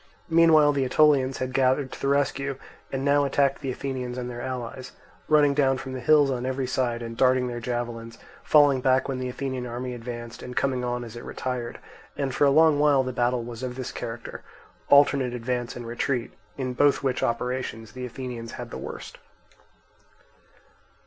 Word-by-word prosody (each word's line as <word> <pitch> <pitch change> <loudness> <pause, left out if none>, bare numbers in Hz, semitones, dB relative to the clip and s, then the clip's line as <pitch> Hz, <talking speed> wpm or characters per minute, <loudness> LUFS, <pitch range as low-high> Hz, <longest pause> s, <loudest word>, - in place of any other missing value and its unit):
Meanwhile 160 -3 +6
the 140 -1 +1
Aetolians 135 -1 +3
had 130 0 -3
gathered 130 +1 +2
to - - -9
the - - 0
rescue, 140 0 0 0.4
and 135 0 -2
now 145 0 +4
attacked 140 0 +1
the 135 - -3
Athenians 130 -1 -4
and 125 -1 -4
their 120 0 -6
allies, 125 0 -6 0.3
running 150 -2 +4
down 135 -2 +2
from 130 0 -7
the 130 - -4
hills 145 +2 +4
on 125 -2 -2
every 130 +1 -2
side 120 -2 -1
and 115 0 -6
darting 130 +1 +3
their 120 -1 -4
javelins, 115 -1 -4 0.3
falling 145 -3 +5
back 130 0 +2
when 135 -2 -3
the 130 0 -3
Athenian 130 -1 -4
army 125 +1 -5
advanced, 120 -1 -7
and 125 0 -8
coming 130 -2 0
on 125 0 -2
as 115 -1 -9
it 120 - -8
retired; 125 -2 -4 0.4
and 135 -2 -2
for 145 - +3
a - - +5
long 155 +1 +5
while 145 -3 +4
the 130 0 -4
battle 120 0 0
was 120 0 -8
of 125 -1 -4
this 130 -1 -5
character, 115 0 -7 0.5
alternate 140 -3 +5
advance 120 0 -3
and 120 - -7
retreat, 120 +1 -2 0.2
in 130 -2 -3
both 145 +3 +3
which 130 -2 0
operations 115 -2 -2
the 130 - -8
Athenians 120 -2 -7
had - - -7
the - - -6
worst. - - -8
130 Hz, 185 wpm, -25 LUFS, 120-140 Hz, 0.5 s, Meanwhile